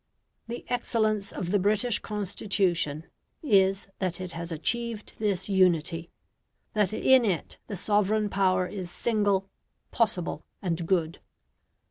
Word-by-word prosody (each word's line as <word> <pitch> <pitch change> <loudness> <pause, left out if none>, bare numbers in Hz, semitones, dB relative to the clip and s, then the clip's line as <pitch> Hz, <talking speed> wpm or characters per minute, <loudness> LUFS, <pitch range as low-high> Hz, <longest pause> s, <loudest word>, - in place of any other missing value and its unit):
The 235 +1 -6
excellence 215 -4 0
of 175 -1 -4
the 205 - +3
British 210 +4 +2
Constitution 190 -6 -1 0.4
is 195 -7 +3
that 185 -2 -2
it 185 -1 -5
has 170 +1 -5
achieved 225 +7 -2
this 205 -4 0
unity; 175 -4 +2 0.6
that 210 -3 +2
in 260 +3 +5
it 185 -8 -2
the 200 - -4
sovereign 210 +2 +2
power 185 -2 +2
is 185 -1 -6
single, 205 -2 +1 0.4
possible, 185 -9 0 0.2
and 170 -3 -2
good. 170 -3 +1
195 Hz, 120 wpm, -28 LUFS, 175-215 Hz, 0.6 s, in